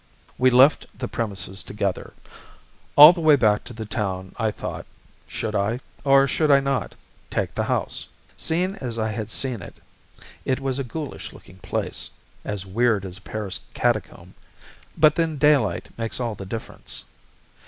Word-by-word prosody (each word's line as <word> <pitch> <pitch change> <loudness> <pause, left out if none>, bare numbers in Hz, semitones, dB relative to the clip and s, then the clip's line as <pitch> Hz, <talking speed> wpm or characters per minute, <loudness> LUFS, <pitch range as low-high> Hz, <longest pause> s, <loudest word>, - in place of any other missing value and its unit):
We 130 0 +6
left 130 +4 +5
the 125 - -3
premises 95 -5 -3
together. 100 -3 -3 0.8
All 150 +4 +11
the 170 - -5
way 155 -2 +6
back 105 -6 +3
to - - -9
the 110 -1 -6
town 95 -3 -3
I 110 -1 +1
thought - - -6 0.4
should 110 -1 -4
I, 105 +4 0 0.2
or 135 0 +5
should 155 +3 +1
I 140 -1 +7
not, 135 -7 -2 0.3
take - - -2
the - - -1
house? - - -1 0.3
Seen 180 +4 0
as 120 -7 -5
I 110 -1 -1
had 110 0 -4
seen 125 -5 -1
it, - - -10 0.7
it 130 - 0
was 135 0 -2
a - - -1
ghoulish 145 +3 -6
looking 95 - -15
place - - -3 0.3
as 100 -2 -4
weird 105 0 +1
as 90 +1 -6
a - - -21
Paris 100 -3 -5 0.2
catacomb - - -1 0.6
but 155 -1 +6
then 165 -2 0
daylight 130 - +3
makes 115 +1 -2
all 120 -3 -1
the 95 -1 -8
difference. 110 +3 -6
115 Hz, 165 wpm, -24 LUFS, 105-135 Hz, 0.8 s, All